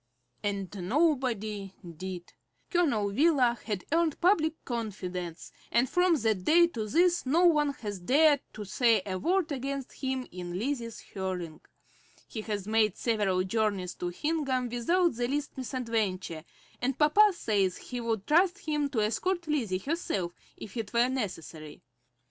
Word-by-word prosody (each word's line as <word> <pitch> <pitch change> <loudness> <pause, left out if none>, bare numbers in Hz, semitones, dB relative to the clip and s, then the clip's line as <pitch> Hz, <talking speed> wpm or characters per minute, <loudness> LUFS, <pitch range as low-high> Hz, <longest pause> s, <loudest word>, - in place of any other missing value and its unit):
And 200 -1 -3
nobody 230 - 0 0.2
did. 180 0 -7 0.4
Colonel 280 - +2
Wheeler 255 -2 +3
had 210 -4 -3
earned 330 -1 +2
public 325 -4 +2
confidence, 185 -7 -5 0.2
and 240 +2 +3
from 355 +4 +3
that 220 -8 0
day 340 - +6
to 220 -9 -4
this 345 - +3
no 335 +7 +4
one 300 -4 +4
has 205 -6 -6
dared 285 - +4
to 210 -1 -7
say 225 0 +3
a 185 -2 -3
word 355 - +1
against 275 0 -3
him 260 -1 -3
in 175 0 -5
Lizzie's 235 0 -3
hearing. 180 -5 -5 0.7
He 220 - -5
has 205 -3 -4
made 215 -2 +2
several 205 -6 +1
journeys 195 -2 -1
to 180 - -4
Hingham 265 - -1
without 335 +10 +2
the 240 +1 -1
least 290 +3 -2
misadventure, 220 - -2 0.4
and 260 +2 0
papa 405 +8 +6
says 200 - 0
he 245 -1 -6
would 225 -4 -2
trust 355 +4 +4
him 300 -6 -1
to 235 -6 0
escort 345 - 0
Lizzie 240 -12 0
herself 195 - -2 0.2
if 205 - -10
it 220 -1 -4
were 240 +1 +4
necessary. 165 - -5
235 Hz, 145 wpm, -29 LUFS, 195-300 Hz, 0.7 s, day